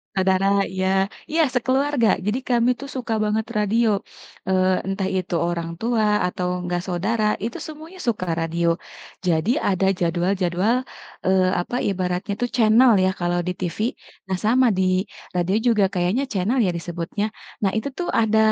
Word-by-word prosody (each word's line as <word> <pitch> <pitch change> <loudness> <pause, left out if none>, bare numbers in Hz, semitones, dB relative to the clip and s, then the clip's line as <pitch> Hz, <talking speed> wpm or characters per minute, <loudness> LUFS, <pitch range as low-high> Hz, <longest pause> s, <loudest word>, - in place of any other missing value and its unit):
Saudara, 190 0 +2 0.2
iya 190 +1 +1 0.2
iya 325 +1 +3
sekeluarga. 260 0 +2 0.2
Jadi, 210 +4 +1
kami 245 0 +2
tuh, 280 - -7
suka 250 -5 -3
banget 215 +1 0
radio, 215 0 +2 0.5
eee, 185 0 +2
entah 195 0 -1
itu 185 -1 -2
orang 170 0 -1
tua, 225 +2 0 0.2
atau 180 0 -2
enggak 175 0 -2
saudara, 205 +5 0 0.2
itu, 230 +2 -3
semuanya 315 +4 -10
suka 210 -5 0
radio. 170 +1 0 0.5
Jadi, 165 +3 +2
ada 190 -1 +1
jadwal-jadwal, 180 +4 +1 0.5
eee, 185 0 +3
apa 175 - -5
ibaratnya 185 0 -1
tuh, 245 - 0
channel 230 +2 +6
ya, 185 - +3
kalau 175 0 0
di 180 +1 -2
TV. 175 -3 -4 0.5
Nah, 185 - 0
sama, 245 +6 +3
di 185 0 +2 0.3
radio 180 +2 +1 0.2
juga 205 -2 +3
kayaknya, 185 +7 0
channel, 220 +6 +1
ya, 185 - +2
disebutnya? 175 +4 -4 0.4
Nah, 195 - +3
itu 220 +6 -2
tuh, 355 - -2
ada 220 -1 +3
195 Hz, 150 wpm, -22 LUFS, 180-230 Hz, 0.5 s, channel